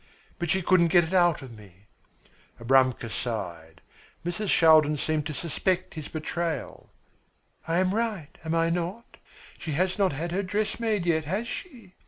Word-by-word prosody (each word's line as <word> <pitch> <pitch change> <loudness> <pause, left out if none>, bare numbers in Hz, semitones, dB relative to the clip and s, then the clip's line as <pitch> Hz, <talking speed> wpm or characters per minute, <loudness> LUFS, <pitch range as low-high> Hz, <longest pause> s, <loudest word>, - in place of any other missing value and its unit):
But 170 -1 -2
she 190 +3 +1
couldn't 170 -1 +4
get 175 +1 +5
it 165 +3 -5
out 175 -5 +3
of 130 - -10
me." 100 -2 -17 0.7
Abramka 130 0 +3
sighed. 90 -8 -5 0.4
Mrs. 175 +4 -2
Shaldin 155 -2 +5
seemed 155 0 -1
to 155 - -5
suspect 180 +4 -1
his 155 -3 -7
betrayal. 160 -2 -4 0.8
"I 165 +1 +1
am 185 +1 +2
right, 210 -9 -2
am 160 0 -1
I 165 0 +2
not? 180 +7 -4 0.4
She 160 - -4
has 185 +6 0
not 190 -5 +3
had 165 +5 -4
her 190 +3 0
dress 205 +4 -2
made 215 -6 0
yet, 160 -3 +1
has 200 +9 -2
she? 235 - -8
170 Hz, 165 wpm, -27 LUFS, 150-185 Hz, 0.8 s, get